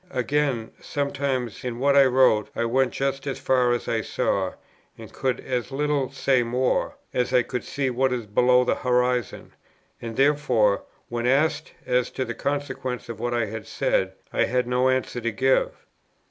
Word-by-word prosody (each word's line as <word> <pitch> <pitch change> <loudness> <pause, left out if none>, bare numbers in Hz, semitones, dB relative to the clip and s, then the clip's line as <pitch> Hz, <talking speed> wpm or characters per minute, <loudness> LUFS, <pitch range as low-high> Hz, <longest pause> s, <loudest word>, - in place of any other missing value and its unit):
Again, 130 -5 -1
sometimes 140 -4 -2
in 125 -2 -4
what 140 +2 +2
I 140 -1 +7
wrote 125 -5 +3
I 115 - 0
went 130 +2 +2
just 135 +1 -2
as 135 - -2
far 125 -2 +2
as 120 - -1
I - - 0
saw, 95 -2 -1 0.4
and - - -11
could 130 -2 -1
as 125 0 -3
little 140 -1 0
say 135 -1 +2
more, 125 +2 0 0.2
as 125 0 0
I 125 -1 +4
could 125 +1 -4
see 135 -2 -2
what 130 +2 +1
is 120 -3 -2
below 125 +4 +4
the - - +1
horizon; 125 -2 0 0.5
and 115 -1 -6
therefore, 135 -8 +2 0.2
when 120 0 -2
asked 140 +5 +1
as 125 -1 +1
to 130 - -2
the 115 - -4
consequences 130 -3 -3
of 115 -2 -6
what 120 +1 -1
I 120 -1 +1
had 110 0 -7
said, 95 0 0 0.2
I - - +2
had 125 +1 0
no 125 +1 +2
answer 130 -1 -1
to 115 0 -1
give. 130 +4 +2
125 Hz, 175 wpm, -24 LUFS, 120-135 Hz, 0.5 s, I